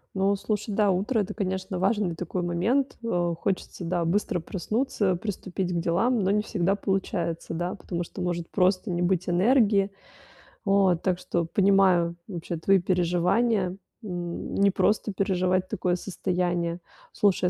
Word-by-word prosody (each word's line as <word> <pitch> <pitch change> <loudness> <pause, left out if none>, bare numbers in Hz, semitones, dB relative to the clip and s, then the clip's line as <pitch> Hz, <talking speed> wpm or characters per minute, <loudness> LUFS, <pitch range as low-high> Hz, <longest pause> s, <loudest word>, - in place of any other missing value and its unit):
Ну, 195 +1 +2
слушай, 210 +1 -3
да, 205 0 +3
утро- 205 +7 0
это, 210 0 -2
конечно, 190 -2 -3
важный 195 -2 +1
такой 180 +2 -3
момент, 200 +11 0
а. 175 -6 0
Хочется, 185 +1 -3
да, 175 0 0
быстро 180 +1 0
проснуться, 200 +2 -1
приступить 185 -1 -4
к 170 - 0
делам, 195 +9 +1
но 190 - +2
не 210 +1 +2
всегда 195 -2 0
получается, 185 -5 -2
да, 175 +4 -2
потому 175 -3 -4
что 185 - -8
может 175 -1 -2
просто 185 +2 +1
не 175 -1 -1
быть 180 0 +1
энергии. 200 +1 +3 0.7
Вот. 195 -4 +3
Так 180 -2 +1
что 175 -1 -1
понимаю 185 -2 +3
вообще 170 -3 -5
твои 190 +4 +3
переживания. 180 +3 +1 0.3
М, 175 -4 -5
непросто 200 +2 +2
переживать 185 -1 +1
такое 180 -1 0
состояние. 175 -2 -2 0.3
Слушай, 195 -3 +2
185 Hz, 145 wpm, -26 LUFS, 175-200 Hz, 0.7 s, да